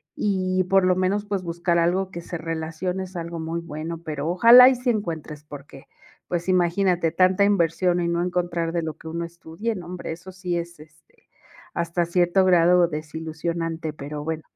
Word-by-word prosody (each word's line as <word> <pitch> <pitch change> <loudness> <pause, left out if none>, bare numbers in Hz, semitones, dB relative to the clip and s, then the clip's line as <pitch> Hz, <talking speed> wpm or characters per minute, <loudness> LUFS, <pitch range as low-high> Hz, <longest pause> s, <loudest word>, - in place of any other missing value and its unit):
y 185 -2 0
por 195 +1 +3
lo 185 0 +3
menos 190 +3 0
pues 200 -2 -3
buscar 170 0 -1
algo 180 +3 +1
que 170 - -6
se 170 0 -6
relacione 165 +3 -4
es 185 0 -11
algo 170 0 -5
muy 165 +1 -3
bueno, 165 +1 -6
pero 150 -2 -4
ojalá 235 +8 +8
y 265 - +5
sí 250 0 -2
encuentres 160 -8 -3
porque, 140 -2 -12 0.4
pues, 175 +1 -3
imagínate 180 -1 +2
tanta 185 +3 +3
inversión 180 -2 +2
y 170 - 0
no 170 0 0
encontrar 175 -2 -1
de 170 0 -1
lo 160 -1 -5
que - - -12
uno 170 +1 -3
estudie, 170 +6 -5
no 180 -3 -8
hombre, 180 0 -6
eso 175 +3 -11
sí 180 -2 -3
es, 170 -1 -6
este, 155 +1 -20 0.5
hasta 170 +1 0
cierto 175 +2 +2
grado 175 -1 +5
desilusionante, 160 +1 -4
pero 150 0 -7
bueno. 160 0 -3
170 Hz, 180 wpm, -24 LUFS, 165-185 Hz, 0.5 s, ojalá